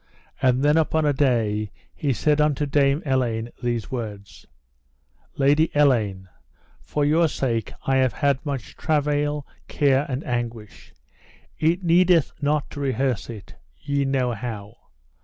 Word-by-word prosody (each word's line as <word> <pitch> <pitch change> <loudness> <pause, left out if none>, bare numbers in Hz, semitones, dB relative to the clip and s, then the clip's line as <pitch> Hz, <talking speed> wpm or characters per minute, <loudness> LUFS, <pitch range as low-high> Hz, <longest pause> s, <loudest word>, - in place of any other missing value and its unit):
And 130 0 +2
then 150 +2 +4
upon 160 -1 +1
a 145 - +3
day 115 -6 +1 0.2
he 145 - -1
said 150 +4 +2
unto 150 -1 +1
Dame 140 +1 +2
Elaine 120 -4 -1
these 120 -1 -2
words: 105 -6 -7 0.9
Lady 145 +3 +3
Elaine, 110 -10 +2 0.5
for 145 -1 -1
your 160 +3 +3
sake 120 -6 -2
I 135 0 +2
have 130 -3 +2
had 140 -2 0
much 140 -4 -5
travail, 150 -2 0 0.2
care, 140 0 +2
and 130 +2 -3
anguish, 120 -3 -5 0.7
it 170 +4 +1
needeth 175 -2 +4
not 145 0 0
to - - -7
rehearse 130 -4 -1
it, 110 -4 -9 0.3
ye 140 0 -1
know 135 -2 0
how. 110 -2 -6
135 Hz, 135 wpm, -23 LUFS, 120-150 Hz, 0.9 s, then